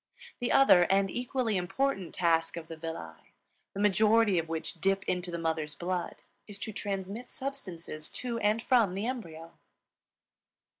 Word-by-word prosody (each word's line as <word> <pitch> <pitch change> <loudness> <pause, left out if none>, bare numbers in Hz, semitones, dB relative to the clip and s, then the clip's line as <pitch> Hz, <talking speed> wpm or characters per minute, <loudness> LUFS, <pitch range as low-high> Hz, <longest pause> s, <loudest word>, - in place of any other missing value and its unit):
The 245 - -1
other, 230 -10 +7
and 195 0 +3
equally 245 -3 -1
important, 190 +1 -1
task 165 -1 +2
of 165 -1 -7
the 165 - -6
villi, 155 - -8 0.4
the - - -4
majority 210 0 +4
of 165 0 -4
which 165 0 -4
dip 195 +1 +2
into 180 0 -2
the 170 - -3
mother's 160 -2 -2
blood, 180 0 -3 0.2
is 205 -2 -7
to 220 - -4
transmit 200 +3 -4
substances 185 - -6
to 240 -2 -3
and 215 +1 +1
from 225 -8 +3
the 200 +3 -2
embryo. 170 -10 -5
195 Hz, 150 wpm, -30 LUFS, 165-225 Hz, 0.4 s, other